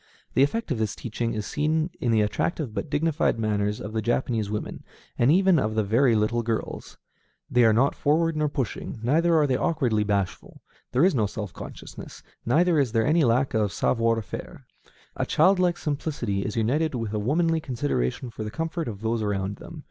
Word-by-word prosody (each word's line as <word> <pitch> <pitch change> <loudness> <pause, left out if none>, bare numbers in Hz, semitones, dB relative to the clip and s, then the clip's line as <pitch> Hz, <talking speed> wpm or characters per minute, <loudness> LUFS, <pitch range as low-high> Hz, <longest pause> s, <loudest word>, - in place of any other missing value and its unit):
The - - +3
effect 195 +8 +1
of 125 - -1
this 110 -2 -1
teaching 115 0 -3
is 105 -1 -3
seen 155 - 0
in 120 - -1
the 110 -1 +4
attractive 120 +4 -1
but 145 - -4
dignified 155 -2 +1
manners 105 -1 -1
of 105 - -7
the 110 - 0
Japanese 115 -2 0
women, 105 0 -5 0.3
and 120 +4 +3
even 185 -1 +4
of 110 -3 -1
the 110 - +2
very 115 +4 +3
little 110 +2 +1
girls. 115 -1 -4 0.5
They 125 -1 +5
are 110 - +6
not 120 +6 +3
forward 165 +2 +1
nor 150 -1 +1
pushing, 130 -4 -4
neither 165 +7 +3
are 150 - +4
they 130 -3 +1
awkwardly 130 -11 +1
bashful; 100 -3 -3 0.3
there 130 +7 +4
is 190 - +3
no 110 -6 +1
self 105 -2 -6
consciousness, - - -10 0.2
neither 165 +5 +3
is 130 -5 0
there 115 -1 +2
any 160 +2 +3
lack 125 +2 +2
of 105 -3 +1
savoir 115 -1 +1
faire; - - -8 0.5
a - - -1
childlike 180 +1 +3
simplicity 140 -9 -2
is 105 - -4
united 135 +7 +1
with 115 -3 -3
a 105 - 0
womanly 165 +8 +1
consideration 120 - -2
for 110 - -6
the 105 - -4
comfort 165 +5 -3
of 105 -3 -6
those 115 0 -1
around 100 -1 -2
them. - - -10
120 Hz, 195 wpm, -25 LUFS, 110-155 Hz, 0.5 s, are